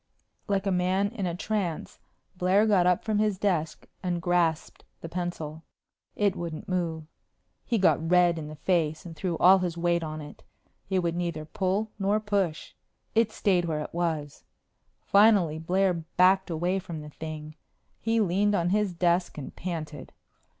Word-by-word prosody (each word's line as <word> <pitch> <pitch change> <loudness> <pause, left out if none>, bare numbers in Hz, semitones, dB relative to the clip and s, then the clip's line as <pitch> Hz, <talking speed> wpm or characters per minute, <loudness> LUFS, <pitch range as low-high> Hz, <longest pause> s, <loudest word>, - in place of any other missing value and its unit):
Like 200 -1 0
a 195 - +1
man 185 +2 +1
in 200 -6 -3
a 170 - -2
trance, 185 -4 -3 0.4
Blair 185 +4 +3
got 195 -5 +4
up 180 -1 +2
from 215 -2 0
his 210 -2 +1
desk 175 -6 -1 0.2
and 180 -2 -1
grasped 170 -2 0 0.2
the 165 - -7
pencil. 165 -3 -4 0.5
It 200 -2 +1
wouldn't 170 -3 -6
move. 170 -3 -2 0.6
He 235 - +1
got 165 -4 +2
red 175 -2 +4
in 150 - -6
the 155 - -8
face 160 -1 0
and 165 -2 -8
threw 175 -1 -2
all 190 +2 +7
his 175 -2 -2
weight 170 0 +1
on 155 -1 -5
it. 150 -1 -10 0.5
It 190 -2 +1
would 170 -1 0
neither 170 -3 -3
pull 195 +6 -1
nor 200 +2 +2
push. 200 -7 -2 0.4
It 225 -1 +3
stayed 185 -5 +1
where 155 -2 -2
it - - -7
was. 160 -4 -2 0.6
Finally 200 -7 +4
Blair 185 +3 +2
backed 180 +3 +2
away 175 +3 0
from 170 -4 -7
the 150 - -9
thing. 155 0 -7 0.5
He 225 0 +1
leaned 205 +1 +2
on 175 -1 +1
his 205 -3 +1
desk 175 0 +1
and 145 - -7
panted. 155 -5 -6
175 Hz, 165 wpm, -27 LUFS, 165-195 Hz, 0.6 s, all